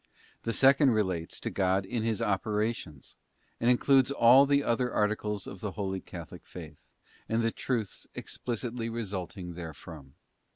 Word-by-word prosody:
The 115 - -2
second 135 +3 +5
relates 95 -6 -1
to - - -3
God 95 0 +1
in 115 +4 -2
His 115 0 -1
operations, 105 -6 -2 0.4
and 120 - +2
includes 130 +1 +4
all 135 +1 +6
the 140 0 +3
other 125 0 0
articles 105 -1 -1
of 95 - -8
the 105 -1 -4
Holy 95 -2 -3
Catholic 85 -3 -10
Faith, - - -10 0.5
and 115 +1 +1
the 115 - +2
truths 115 -6 -3
explicitly 120 -1 -4
resulting 95 -5 -5
therefrom. 80 -4 -10
110 Hz, 140 wpm, -29 LUFS, 95-120 Hz, 0.5 s, all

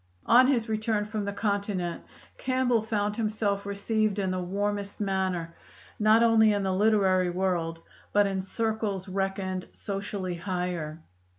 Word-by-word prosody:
On 250 +2 +6
his 245 -4 +1
return 215 -1 0
from 210 -1 -3
the 200 - -2
Continent, 200 -4 -2 0.4
Campbell 255 -3 +1
found 210 -1 -1
himself 210 -3 -1
received 210 +1 0
in 190 -2 0
the 185 0 -1
warmest 200 +2 -2
manner, 190 -4 -1 0.5
not 215 +2 +5
only 225 -2 +5
in 200 -1 0
the 190 -1 0
literary 190 -3 +3
world 175 -2 -1 0.3
but 205 0 +4
in 195 -1 -1
circles 215 -1 -2
reckoned 190 -1 -2
socially 195 -2 -4
higher. 175 -3 -3
200 Hz, 135 wpm, -28 LUFS, 185-215 Hz, 0.5 s, On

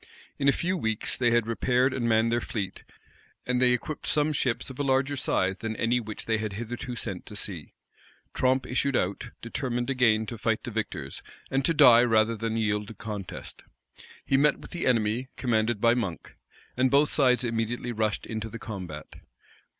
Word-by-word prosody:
In 140 - +1
a - - +8
few 180 +6 -1
weeks, 110 -8 -1
they 120 -2 +2
had 120 -1 +3
repaired 125 +3 +1
and 120 -3 -1
manned 110 +1 +3
their 120 +1 +1
fleet; 100 -5 -5 0.6
and 125 0 0
they 125 -1 +5
equipped 125 +5 -2
some 150 0 +2
Ships 130 -2 -1
of 130 - -12
a - - +1
larger 135 +1 +1
size 95 -7 0
than 110 -1 -3
any 115 +3 +1
which 110 -2 -7
they 110 -1 +1
had 110 -2 -3
hitherto 120 +4 -5
sent - - -4
to - - -9
sea. - - -5 0.6
Tromp 130 +1 +2
issued 135 +1 0
out, 95 -2 -1
determined 120 +1 -2
again 115 -4 +3
to 110 +1 -7
fight - - 0
the - - -5
victors, - - -4 0.3
and 135 0 +1
to 165 - +3
die 125 -6 +8
rather 115 -1 +3
than 115 0 -3
to - - 0
yield 105 -1 0
the 115 - -9
contest. 105 -4 -7 0.6
He 135 - +3
met 150 +1 +4
with - - -13
the 175 - -2
enemy, 115 +1 +1
commanded 115 -3 +1
by 115 +2 +4
Monk; 100 -9 -4 0.4
and 130 +1 +3
both 140 +2 +4
sides 125 -3 +3
immediately 115 +1 -2
rushed 110 -2 -1
into 110 0 -4
the 115 - -7
combat. 90 -10 -8
120 Hz, 190 wpm, -27 LUFS, 110-130 Hz, 0.6 s, a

